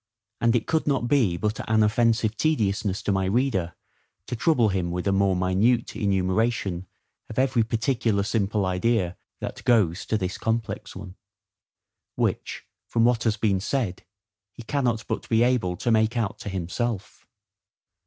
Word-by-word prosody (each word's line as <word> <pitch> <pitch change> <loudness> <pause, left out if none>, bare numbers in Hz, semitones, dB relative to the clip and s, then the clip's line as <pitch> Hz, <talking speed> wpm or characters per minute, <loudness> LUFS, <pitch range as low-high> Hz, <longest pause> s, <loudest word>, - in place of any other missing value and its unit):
And 115 +1 +3
it 115 - +1
could 160 -1 0
not 135 -4 +1
be 120 -10 +2
but 105 +3 -2
an 110 -1 +4
offensive 110 0 +2
tediousness 105 -8 0
to - - 0
my 95 -1 +1
reader, 95 -5 0 0.5
to 120 - -4
trouble 120 -3 +3
him 95 -3 -1
with 90 +1 -3
a - - +3
more 95 -1 +2
minute 95 +7 +1
enumeration 95 -1 0 0.4
of 110 - -8
every 130 -2 +3
particular 115 -2 0
simple 105 -1 0
idea 90 0 0 0.3
that - - -6
goes 105 -8 +2
to 110 - +1
this 95 -2 -3
complex 110 -2 -3
one; 95 0 -9 1.0
which, - - -2 0.2
from 115 -1 +2
what 120 -1 +2
has 110 -1 +1
been 100 -3 +1
said, 105 -3 -2 0.5
he 120 - -11
cannot 120 -3 -1
but - - -4
be 115 0 +4
able 115 -8 +1
to 120 - 0
make 110 +1 +2
out 110 -4 -2
to - - -6
himself. 95 +3 -4
110 Hz, 155 wpm, -25 LUFS, 95-120 Hz, 1.0 s, an